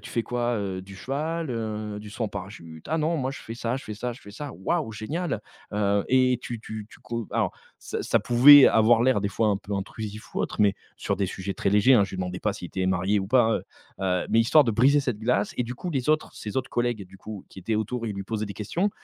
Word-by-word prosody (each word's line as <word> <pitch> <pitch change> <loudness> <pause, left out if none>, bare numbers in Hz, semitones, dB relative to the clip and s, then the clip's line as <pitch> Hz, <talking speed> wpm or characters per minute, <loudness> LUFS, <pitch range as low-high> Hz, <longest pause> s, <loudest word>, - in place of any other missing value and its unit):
tu - - -10
fais 115 - 0
quoi, 120 0 -1
heu, 95 -3 -3
du 95 +1 -12
cheval, 155 - -3
heu, 110 -2 -4
du 105 0 -10
saut 115 - -5
en - - -2
parachute?», 90 -6 -9
«Ah 160 - +2
non, 160 +2 +1
moi 130 -3 -1
je - - -9
fais 115 - -7
ça 120 +1 -2
je 135 - -7
fais 105 - -6
ça 125 +4 -3
je 120 - -13
fais 100 - -12
ça», 140 +6 -7 0.2
«Waouh, 155 -10 0
génial, 145 - -3 0.3
heu 100 -1 +1
et 130 -1 +4
tu 120 -2 -6
tu 110 -1 -7
tu - - -17
co» 115 -2 -4
alors, - - +1 0.3
ça - - -4
ça - - +2
pouvait 135 +4 +9
avoir 115 +1 +5
l'air 130 -4 +3
des 100 - 0
fois 110 +3 +1
un 100 - +2
peu 100 +1 -5
intrusif 105 +2 -6
ou - - -1
autre - - -3
mais 100 -2 +4 0.2
sur 100 - -2
des 100 0 0
sujets 95 +1 -5
très 100 - 0
légers, 105 +6 +5
hein, 105 -5 +5
je - - -8
lui - - -6
demandais 90 0 -3
pas 105 - 0
si 95 -3 -7
il - - -12
était 95 +1 -2
marié 95 +2 +1
ou 95 - -3
pas, 115 0 +4
heu - - -5 0.4
heu, 90 -2 0
mais 115 - +4
histoire 125 +7 +6
de 115 - +1
briser 130 +7 +4
cette 125 -6 -2
glace 110 -2 0
et - - +1
du 120 +2 -5
coup, 175 +8 -5
les 135 -3 -2
autres, 155 0 +1
ses 105 +2 -6
autres 130 0 -1
collègues 120 -2 0
et - - -6
du 95 +1 -16
coup, 105 +1 -9
qui - - -13
étaient 100 +4 -2
autour, 115 +2 -2
ils 110 - -2
lui 100 - -4
posaient 110 +1 -3
des 100 - -6
questions 165 - -1
110 Hz, 275 wpm, -26 LUFS, 100-125 Hz, 0.4 s, pouvait